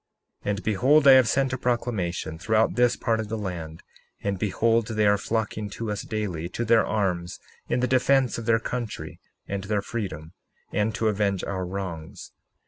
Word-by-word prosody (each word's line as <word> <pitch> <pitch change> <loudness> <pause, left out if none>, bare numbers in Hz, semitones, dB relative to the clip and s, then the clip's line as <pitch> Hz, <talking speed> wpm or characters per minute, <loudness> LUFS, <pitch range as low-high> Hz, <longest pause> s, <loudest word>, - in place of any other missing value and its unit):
61:6 - - -3
And 100 0 -1
behold, 135 +8 +4
I - - +11
have 130 -2 +7
sent 135 +3 +1
a 130 - -2
proclamation 95 -10 -2
throughout 110 +5 +2
this 125 0 +3
part 115 -2 0
of 110 -1 -4
the 110 - -2
land; 85 -6 -6 0.4
and 100 -2 -1
behold, 115 +2 +1
they 110 -2 +1
are 100 0 +4
flocking 110 -1 -2
to 115 -2 -3
us 105 - -3
daily, 95 -7 -3
to 120 +5 -3
their 115 0 +5
arms, 90 -5 -1 0.3
in 120 +1 +1
the 125 - +2
defence 130 -1 +2
of 115 - -7
their 115 -1 +5
country 120 -1 -5 0.3
and 100 0 -4
their 105 -1 0
freedom, 90 -8 -5 0.4
and 105 +2 0
to 110 - 0
avenge 100 -3 0
our 95 -2 -3
wrongs. 90 -4 -6
105 Hz, 185 wpm, -25 LUFS, 95-115 Hz, 0.4 s, I